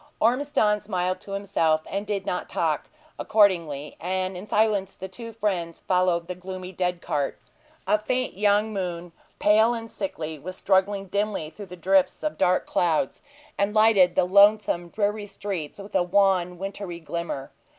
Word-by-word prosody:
Ormiston 230 -3 +2
smiled 185 -2 -2
to 195 - -9
himself, 165 -6 +1
and 200 +1 -4
did 200 -2 -2
not 180 - -3
talk, 160 -3 -1 0.3
accordingly; 170 -9 +2
and 185 +2 -2
in 185 +4 -8
silence 210 -3 +1
the 190 - -7
two 230 +5 -7
friends 190 -7 -2
followed 180 -2 +2
the 180 - -3
gloomy 185 0 -7
dead 180 -1 -2
cart. 145 -2 -1 0.5
A 210 - +3
faint 255 +4 -1
young 210 +2 +2
moon, 175 -3 -4 0.3
pale 220 +3 +4
and 230 -1 -6
sickly, 160 -6 -4
was 185 +6 -6
struggling 195 +1 +1
dimly 200 -5 -2
through 205 +4 -10
drifts 185 +1 +1
of 305 - -2
dark 180 +1 +3
clouds, 160 -6 0 0.4
and 200 +2 +1
lighted 205 -5 +5
the - - +4
lonesome, 200 -2 +4
dreary 205 +1 -1
streets 195 -6 -5
with 200 0 -10
a 190 - +3
wan, 180 -1 +2
watery 195 -2 -6
glimmer. 160 -4 -5
190 Hz, 155 wpm, -25 LUFS, 175-205 Hz, 0.5 s, lighted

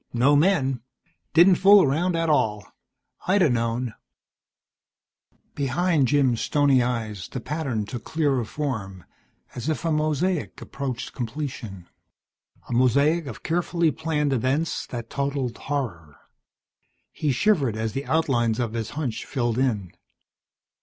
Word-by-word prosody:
No 130 +5 +4
men. 145 -6 +2 0.5
Didn't 175 +2 +7
fool 200 0 +7
around 165 +6 +1
at 165 0 0
all. 110 -9 +1 0.6
I'd 190 +1 +4
a 150 - +3
known." 115 0 -1 1.6
Behind 145 +1 +1
Jim's 130 -4 +2
stony 145 -3 +3
eyes 110 -6 -3
the 130 - -6
pattern 130 -5 -3
took 115 +1 -7
clearer 145 -5 0
form, 110 - -5 0.5
as 125 +5 -4
if 155 +2 -2
a 165 - +1
mosaic 155 +2 0
approached 135 -3 -5
completion. 115 - -6 0.8
A - - -4
mosaic 140 +6 +3
of 120 - -8
carefully 170 -1 +1
planned 150 -2 -1
events 135 +6 -1
that 120 -2 -7
totalled 140 -3 -2
horror. 100 - -4 1.0
He 150 - -1
shivered 140 - +2
as 110 0 -2
the 135 +1 -4
outlines 120 -8 +1
of 115 -3 -2
his 115 -2 -3
hunch 130 -8 -3
filled 120 -3 -1
in. 105 -9 0
135 Hz, 125 wpm, -24 LUFS, 115-155 Hz, 1.6 s, Didn't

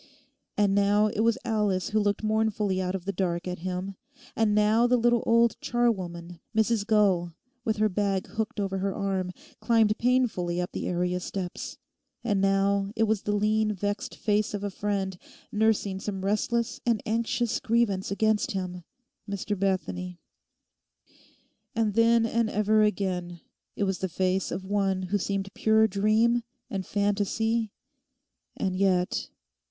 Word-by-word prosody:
And 205 -1 +3
now 205 +1 +3
it - - -4
was 230 +2 +3
Alice 210 -5 0
who 215 - +1
looked 205 0 0
mournfully 215 -3 +1
out 185 +1 -2
of 185 -2 -5
the 200 - -1
dark 175 -2 -2
at 180 -1 -4
him; 185 +2 -4 0.4
and 215 -2 +2
now 215 +3 +4
the 250 0 +3
little 240 0 +3
old 230 0 +4
charwoman, 180 -8 -1 0.2
Mrs 220 -1 +2
Gull, 190 -6 +2 0.3
with 220 -1 0
her 215 0 +3
bag 195 -1 0
hooked 220 +1 -4
over 195 -1 -1
her 195 0 -1
arm, 190 -2 -1 0.3
climbed 225 -3 +3
painfully 230 -9 +1
up 180 - -2
the - - -4
area 180 0 0
steps; 180 0 -5 0.5
and 205 -5 +1
now 195 0 +2
it 225 - +2
was 220 -2 +1
the 210 - -2
lean 215 +1 +2
vexed 205 +1 -3
face 210 0 0
of 200 - -5
a 205 - -2
friend, 195 -2 -2 0.3
nursing 210 -3 +1
some 195 -1 -4
restless 230 +4 0
and 230 -3 +1
anxious 230 +1 0
grievance 220 -5 +1
against 215 +2 +1
him—Mr 195 +2 -6
Bethany; 95 - -2 1.6
and 220 -2 +1
then 230 +1 +4
and 230 0 +1
ever 215 +1 +2
again 185 -4 -1 0.4
it - - -1
was 190 -2 -1
the 190 - -2
face 185 +2 0
of 190 - -4
one 195 -1 0
who 200 +3 0
seemed 195 +1 -3
pure 220 0 +4
dream 220 +4 +2 0.3
and 190 -2 -3
fantasy 210 +2 0 0.9
and 185 -1 -1
yet... 185 -2 +1
205 Hz, 150 wpm, -27 LUFS, 190-220 Hz, 1.6 s, now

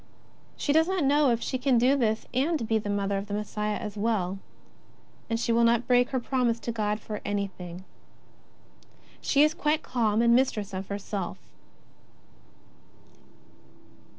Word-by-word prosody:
She 285 - 0
does 320 +2 +4
not 375 -3 0
know 285 0 +4
if 235 -1 0
she 260 - -2
can 255 -1 +3
do 255 +4 +4
this 220 -5 0
and 270 -1 0
be 220 0 +2
the 205 - -5
Mother 200 -1 0
of 200 - -7
the 205 - -3
Messiah 210 0 -2
as 210 -3 -6
well, 200 -3 -1 0.9
and 230 0 0
she 235 - 0
will 235 +1 +3
not 235 +1 +3
break 245 0 +4
her 260 - -1
promise 240 -2 0
to 235 - -3
God 210 -2 -1
for 210 -1 -6
anything. 185 -3 -4 1.4
She 285 0 +3
is 305 +1 +3
quite 305 0 0
calm 225 -3 +1
and 235 0 +5
mistress 225 -6 +1
of 190 +1 -4
herself. 200 -2 -4
230 Hz, 155 wpm, -27 LUFS, 205-260 Hz, 1.4 s, and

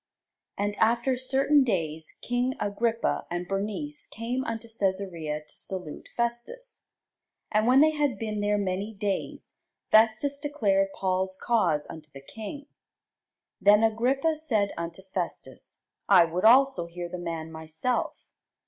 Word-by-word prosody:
And 205 +1 -1
after 235 +3 +2
certain 270 +3 +3
days 160 -8 -2
king 245 +2 0
Agrippa 225 +3 -1
and 175 0 -3
Bernice 215 +10 -4
came 240 +4 -3
unto 230 0 -4
Cæsarea 185 -8 -2
to - - -14
salute 180 -5 -7
Festus. 240 - -4 0.6
And 215 +1 +2
when 260 +2 +6
they 310 +1 +6
had 295 -4 0
been 215 -2 -3
there 205 0 +1
many 200 +2 -2
days, 200 -1 -3 0.4
Festus 225 +6 +4
declared 210 -10 +1
Paul's 190 0 -1
cause 175 -11 +1
unto 155 -1 -10
the 135 -2 -12
king. 225 - -8 1.0
Then 210 +2 +6
Agrippa 260 +8 +2
said 220 -10 0
unto 170 +2 -6
Festus, 190 -2 -6 0.3
I 175 - +8
would 175 +4 -2
also 245 -7 +5
hear 175 +1 -6
the 180 +1 -6
man 165 -2 -5
myself. 160 +9 -2
210 Hz, 130 wpm, -27 LUFS, 180-245 Hz, 1.0 s, I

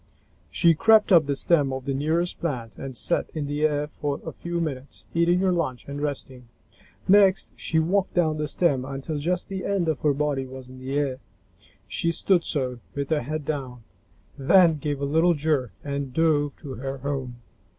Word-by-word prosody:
She 170 -2 +4
crept 215 +6 +5
up 165 -5 +6
the 140 - 0
stem 145 -2 +2
of 130 0 -5
the 140 - -1
nearest 160 +6 0
plant 125 -9 -3
and 135 -3 -7
sat 175 - 0
in 155 -2 -2
the 145 +1 -3
air 145 -1 -1
for 145 0 -1
a - - -4
few 170 0 -4
minutes, 140 -5 -5
eating 170 +1 +3
her 190 -1 +3
lunch 150 -8 -2
and 140 +1 -5
resting. 130 -4 -5 0.6
Next 195 -1 +4
she 160 - -2
walked 185 +4 +1
down 160 -3 +2
the 150 - -1
stem 145 -5 +1
until 140 +3 -4
just 175 +4 -1
the 190 -1 -5
end 195 -4 0
of 160 -3 0
her 145 -2 +2
body 140 -2 -1
was 130 -1 -10
in 130 0 -11
the 135 +2 -3
air. 135 -3 -1 0.7
She 170 - -1
stood 175 +1 +2
so, 130 -6 -2 0.2
with 140 0 -3
her 155 -2 +2
head 155 +3 -4
down, 130 -6 -4 0.6
then 165 +2 +5
gave 145 -1 -2
a 140 - -1
little 165 +4 +3
jerk 145 -5 0
and 140 -2 -3
dove 145 -1 +2
to 135 - -7
her 135 +3 -5
home. 135 -2 -4
145 Hz, 190 wpm, -25 LUFS, 135-170 Hz, 0.7 s, up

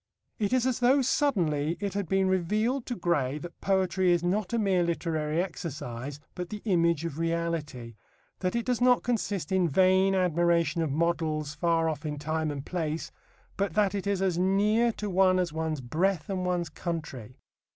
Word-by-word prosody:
It 205 -2 0
is 255 -1 +2
as 260 -2 0
though 260 +3 +4
suddenly 170 - +1
it 200 -1 -3
had 200 -4 -3
been 195 0 +2
revealed 215 +8 0
to 245 - -2
Gray 150 - 0
that 175 +3 -10
poetry 190 -1 +2
is 175 -1 +2
not 190 +2 0
a 235 - +1
mere 195 -5 +2
literary 165 -1 -1
exercise 145 -6 -6
but 180 -1 -5
the 210 -1 -7
image 170 -5 +2
of 160 -2 -5
reality; 165 -8 -2 0.5
that 185 +2 -1
it 235 - -1
does 250 -1 0
not 250 0 +4
consist 205 -8 -2
in 185 -3 +2
vain 190 +4 +4
admiration 170 -2 +2
of 160 - 0
models 155 -1 -1
far 165 +1 +1
off 155 -2 -3
in 150 -1 -4
time 155 +1 -2
and 140 -2 -5
place, 160 -3 -3 0.5
but 195 -4 -1
that 205 -2 +2
it 200 -1 -3
is 195 -1 0
as 180 -3 +1
near 210 +5 +3
to 210 - -5
one 185 -1 +3
as 180 -4 -1
one's 160 -2 -2
breath 175 - -1
and 185 -1 -2
one's 175 -2 -1
country. 150 -9 -6
175 Hz, 180 wpm, -28 LUFS, 160-195 Hz, 0.5 s, though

